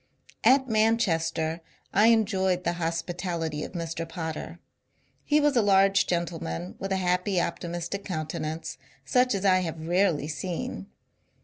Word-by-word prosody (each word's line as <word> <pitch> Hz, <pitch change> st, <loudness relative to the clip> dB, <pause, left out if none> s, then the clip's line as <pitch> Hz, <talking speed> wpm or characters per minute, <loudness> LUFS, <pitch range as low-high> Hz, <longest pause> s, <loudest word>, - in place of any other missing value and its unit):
At 265 Hz, 0 st, +5 dB
Manchester 170 Hz, -8 st, +1 dB, 0.3 s
I 210 Hz, +2 st, +5 dB
enjoyed 190 Hz, -5 st, +2 dB
the 170 Hz, -, 0 dB
hospitality 165 Hz, -1 st, -2 dB
of -, -, -7 dB
Mr. 165 Hz, -1 st, -4 dB
Potter. 165 Hz, 0 st, -5 dB, 0.7 s
He 300 Hz, 0 st, +3 dB
was 295 Hz, -2 st, +2 dB
a 235 Hz, -, +5 dB
large 195 Hz, -1 st, +4 dB
gentleman 160 Hz, -, -3 dB
with 195 Hz, -, -4 dB
a -, -, +2 dB
happy 180 Hz, +1 st, +1 dB
optimistic 175 Hz, +3 st, -3 dB
counte 155 Hz, -5 st, -4 dB
nance 155 Hz, -3 st, -5 dB, 0.3 s
such 250 Hz, -, +3 dB
as 195 Hz, 0 st, -2 dB
I 185 Hz, -1 st, +5 dB
have 165 Hz, -3 st, -4 dB
rarely 175 Hz, -4 st, +2 dB
seen. 155 Hz, -, -4 dB
175 Hz, 135 wpm, -27 LUFS, 165-195 Hz, 0.7 s, At